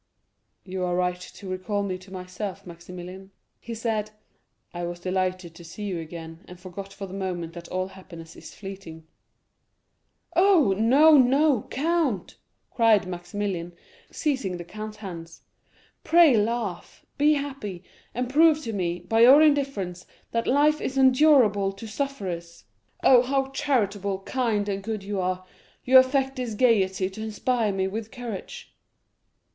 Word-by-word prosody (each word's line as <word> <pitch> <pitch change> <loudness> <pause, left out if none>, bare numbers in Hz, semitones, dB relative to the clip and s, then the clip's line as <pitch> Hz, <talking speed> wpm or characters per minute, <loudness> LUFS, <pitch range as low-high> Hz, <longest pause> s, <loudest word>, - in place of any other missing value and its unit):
"You 185 -1 -4
are 180 -1 0
right 180 0 0
to 190 +2 -11
recall 185 +2 -2
me 185 -2 -3
to 185 +1 -16
myself, 185 +1 -6
Maximilian," 180 +2 -10 0.3
he 235 - -7
said; 220 -2 -2 0.6
"I 175 0 -5
was 175 0 -5
delighted 185 -1 -2
to 170 - -13
see 175 +5 -9
you 190 -4 -3
again, 165 0 -9
and 180 0 -12
forgot 195 +2 -8
for 195 0 -7
the 190 - -10
moment 180 -4 -4
that 170 -1 -9
all 185 +1 -3
happiness 170 -4 -12
is - - -12
fleeting." 190 -5 -9 1.3
"Oh, 355 - +5
no, 280 +8 +6
no, 270 -1 +3
count," 300 - -1 0.3
cried 225 -5 +4
Maximilian, 175 0 -4 0.4
seizing 260 - -2
the 175 - -7
count's 215 +4 -8
hands, 170 -5 -9 0.6
"pray 330 -6 +6
laugh; 215 -3 -2
be 300 +1 +5
happy, 270 - -5 0.3
and 250 +1 -1
prove 310 +3 +5
to 225 - -4
me, 175 -3 -2
by 225 0 0
your 255 +5 +8
indifference, 270 - 0 0.2
that 230 0 -1
life 300 +3 +3
is 270 - -3
endurable 255 -7 +4
to 200 +3 -10
sufferers. 195 -10 -5 0.4
Oh, 250 -2 +7
how 270 +1 -1
charitable, 205 -9 -1
kind, 225 -5 -1
and 200 -1 -2
good 215 0 -4
you 200 0 -3
are; 185 0 -2 0.4
you 260 +1 +8
affect 265 +1 +1
this 245 -4 -3
gayety 195 -6 +2
to 215 +3 -8
inspire 220 +1 0
me 190 -1 -1
with 215 +2 -5
courage." 235 -6 -8
205 Hz, 145 wpm, -25 LUFS, 185-255 Hz, 1.3 s, your